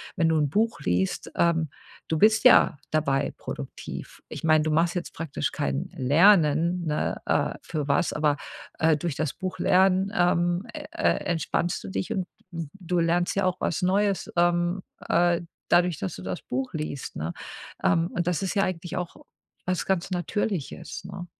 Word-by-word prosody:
wenn 165 -3 +2
du 160 - +3
'n 150 - +2
Buch 220 +7 +1
liest, 90 +2 -1
ähm, 165 -2 +2 0.4
du 160 - 0
bist 220 +3 +5
ja 250 - +6
dabei 145 -3 +1
produktiv. - - -7
Ich - - -7
meine, 155 -1 +4
du 155 - 0
machst 165 +3 +2
jetzt 175 -1 -4
praktisch 160 -3 -3
kein 70 0 -2
Lernen, 165 +3 +4
ne, 150 -1 -1
äh, - - +1
für 150 -3 -3
was, 140 +3 +1
aber, 150 -1 +1 0.4
äh, 160 0 +4
durch 150 0 -3
das 155 -3 -2
Buchlernen, 190 +1 +2
ähm, 175 +3 +2
e 300 - -7
e 335 +3 -8 0.2
entspannst 170 +1 -1
du 95 - -6
dich 95 0 -2
und 185 -2 -2 0.2
du 175 +2 -3
lernst 175 +2 +1
ja 195 - +1
auch 185 0 0
was 170 - -1
Neues, 195 +2 +1
ähm, 175 +1 +2 0.3
äh, 175 0 +3 0.3
dadurch, 175 -2 +3
dass 95 - -4
du - - -9
das 90 0 -5
Buch 130 +1 -3
liest, 155 -3 -5
ne? 80 +3 -3 0.5
Ähm, 165 +1 +3
und 175 -1 -1
das 180 +1 0
ist 190 - -1
ja 200 - +2
eigentlich 175 -2 -3
auch 180 -1 -4 0.5
was 180 -1 -1
ganz 190 -1 0
Natürliches, 180 -1 -3
ne? 180 -1 -7
170 Hz, 170 wpm, -26 LUFS, 155-185 Hz, 0.5 s, ja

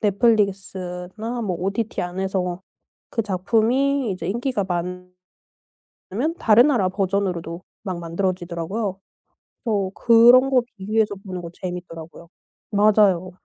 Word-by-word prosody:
넷플릭스나 200 0 0
뭐 195 -5 -2
OTT 200 +4 -2
안에서 180 0 -2 0.5
그 230 - -1
작품이 230 +7 +1
이제 185 -2 -4
인기가 235 0 -1
많으 180 0 -3 1.0
면 275 - -1
다른 225 +3 +6
나라 230 -10 +2
버전으로도 185 -3 -2 0.2
막 185 -3 -4
만들어지더라고요. 185 +3 -3 0.7
그래서 200 -5 0
그런 240 +3 +6
거 260 -2 +5 0.2
비교해서 210 +2 0
보는 185 -2 -5
거 170 - -7
재밌더라고요. 170 -2 -8 0.4
맞아요. 200 -3 +4
195 Hz, 285 characters per minute, -22 LUFS, 180-225 Hz, 1.0 s, 다른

